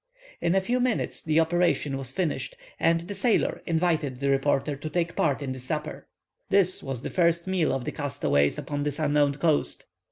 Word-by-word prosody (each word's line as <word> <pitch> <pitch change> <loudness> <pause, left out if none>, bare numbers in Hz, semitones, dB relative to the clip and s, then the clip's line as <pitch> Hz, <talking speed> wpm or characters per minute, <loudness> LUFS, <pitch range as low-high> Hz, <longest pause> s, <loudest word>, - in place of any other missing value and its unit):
In 170 - +1
a 195 - +4
few 245 +6 0
minutes 250 -2 -1
the 155 0 +2
operation 165 -4 +1
was 135 -2 -5
finished, 185 - -2 0.2
and 165 0 +3
the 180 +4 -6
sailor 210 +3 +1
invited 160 -6 0
the 140 0 +1
reporter 135 +1 +1
to 150 +3 -6
take 170 +1 -1
part 145 -2 +1
in 135 - -3
the 130 - -5
supper. 150 +4 -5 0.4
This 190 -2 +4
was 135 -3 -5
the - - -4
first 170 -2 +2
meal 185 -4 +1
of 130 -2 -2
the - - -2
castaways 140 - 0
upon 145 -1 -4
this 145 -1 -1
unknown 145 -2 +2
coast. 155 0 0
155 Hz, 190 wpm, -26 LUFS, 140-175 Hz, 0.4 s, a